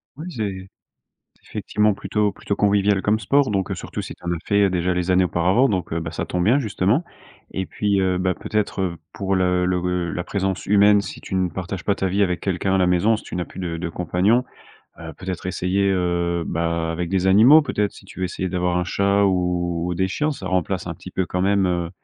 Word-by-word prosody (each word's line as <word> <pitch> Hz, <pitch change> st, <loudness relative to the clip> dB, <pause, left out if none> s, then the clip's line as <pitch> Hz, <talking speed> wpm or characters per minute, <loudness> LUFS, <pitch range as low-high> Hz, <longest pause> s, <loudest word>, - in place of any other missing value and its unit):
Oui 155 Hz, +4 st, -8 dB
c'est 100 Hz, -, -4 dB, 0.7 s
c'est -, -, -22 dB
effectivement 105 Hz, 0 st, +1 dB
plutôt 105 Hz, +1 st, -1 dB
plutôt 100 Hz, -, -3 dB
convivial 100 Hz, -1 st, +2 dB
comme 105 Hz, +2 st, +1 dB
sport 135 Hz, +5 st, +2 dB
donc 95 Hz, -2 st, -1 dB
heu, -, -, -1 dB
surtout -, -, -6 dB
si -, -, -7 dB
tu -, -, -22 dB
en 85 Hz, -, -1 dB
as 85 Hz, -, -1 dB
fait, 100 Hz, 0 st, +3 dB
heu, -, -, +2 dB
déjà 90 Hz, 0 st, 0 dB
les 90 Hz, 0 st, -2 dB
années 90 Hz, 0 st, +4 dB
auparavant 90 Hz, +9 st, +2 dB
donc 90 Hz, -5 st, -2 dB
heu, 85 Hz, -, 0 dB
bah 80 Hz, -1 st, -5 dB
ça -, -, -3 dB
tombe 90 Hz, -1 st, -1 dB
bien 120 Hz, +9 st, +4 dB
justement 110 Hz, -, +1 dB, 0.5 s
et 95 Hz, -, -3 dB
puis, 100 Hz, 0 st, 0 dB
heu, 95 Hz, -1 st, +1 dB
bah 90 Hz, 0 st, +1 dB
peut-être, 105 Hz, -2 st, -2 dB
heu, 90 Hz, -3 st, -1 dB, 0.2 s
pour 95 Hz, -1 st, -1 dB
le 90 Hz, -1 st, +2 dB
le 90 Hz, 0 st, +1 dB
gue 90 Hz, -1 st, -1 dB
la 85 Hz, -, -3 dB
présence 95 Hz, -2 st, -2 dB
humaine 105 Hz, 0 st, +5 dB
si -, -, -8 dB
tu 95 Hz, -, -5 dB
ne 90 Hz, -1 st, +1 dB
partages 90 Hz, +1 st, -5 dB
pas 100 Hz, -, +2 dB
ta 95 Hz, -, -1 dB
vie 100 Hz, +2 st, +2 dB
avec 90 Hz, -2 st, -1 dB
quelqu'un 95 Hz, 0 st, 0 dB
à -, -, +3 dB
la 90 Hz, -1 st, +3 dB
maison, 95 Hz, +5 st, +3 dB
si 110 Hz, -, -8 dB
tu -, -, -8 dB
n'as 90 Hz, -, -2 dB
plus -, -, -11 dB
de 85 Hz, -3 st, -3 dB
de 85 Hz, 0 st, -4 dB
compagnon, 90 Hz, +8 st, +1 dB, 0.6 s
heu, 80 Hz, -1 st, -8 dB
peut-être 90 Hz, -1 st, -5 dB
essayer, 95 Hz, +2 st, 0 dB
heu, 85 Hz, -2 st, 0 dB
bah 85 Hz, 0 st, -1 dB
avec 85 Hz, +1 st, -3 dB
des 95 Hz, 0 st, 0 dB
animaux 120 Hz, +11 st, +7 dB
peut-être. 105 Hz, -7 st, -1 dB
Si -, -, -15 dB
tu -, -, -13 dB
veux 95 Hz, -, 0 dB
essayer 95 Hz, +1 st, -3 dB
d'avoir 90 Hz, 0 st, 0 dB
un 90 Hz, -, 0 dB
chat 100 Hz, +3 st, +2 dB
ou 90 Hz, -2 st, 0 dB
ou -, -, -1 dB
des 95 Hz, +2 st, 0 dB
chiens, 150 Hz, +10 st, -1 dB
ça -, -, -8 dB
remplace 90 Hz, -3 st, -1 dB
un -, -, -4 dB
petit -, -, -11 dB
peu 95 Hz, -, 0 dB
quand 90 Hz, -, -2 dB
même, 100 Hz, 0 st, +2 dB
heu, 85 Hz, -1 st, -1 dB
95 Hz, 240 wpm, -22 LUFS, 90-100 Hz, 0.7 s, animaux